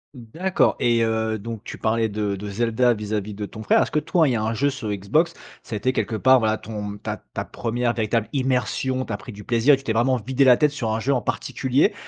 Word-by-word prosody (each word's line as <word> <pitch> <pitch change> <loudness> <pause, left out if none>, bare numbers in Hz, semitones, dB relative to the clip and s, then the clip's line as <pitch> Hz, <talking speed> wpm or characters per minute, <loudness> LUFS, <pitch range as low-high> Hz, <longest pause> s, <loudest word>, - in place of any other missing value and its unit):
D'accord. 160 +11 0
Et 115 -1 +3
heu, 110 0 0
donc 110 +1 -7
tu - - -8
parlais 110 0 +1
de 105 -1 -2
de 100 +1 -6
Zelda, 120 +3 +2
vis-à-vis 105 -1 -4
de 105 0 -4
ton 110 - -9
frère. - - +4
Est-ce - - -6
que 150 - +2
toi, 160 -1 +2
il - - +1
y - - +1
a 110 - -1
un 110 +1 -1
jeu 140 +4 +1
sur 125 -5 -5
Xbox, 135 - +1 0.3
ça 115 - -6
a - - 0
été 130 +5 0
quelque 115 - -1
part, 130 +4 +5
voilà, 110 -1 +1
ton 105 -2 -6
ta - - -5 0.2
ta - - -2
1re 120 +1 -2
véritable 110 0 0
immersion, 130 0 0
tu - - -5
as - - -2
pris 140 -3 -10
du 105 0 -10
plaisir 125 +4 +4
et - - -7
tu 135 - -14
t'es 110 - -1
vraiment 125 +3 +2
vidé 130 +4 +1
la 125 -2 +7
tête 150 -2 +3
sur 120 -7 -3
un 110 - -1
jeu 140 +5 +1
en 125 - 0
particulier? 130 - 0
115 Hz, 260 wpm, -23 LUFS, 110-130 Hz, 0.3 s, la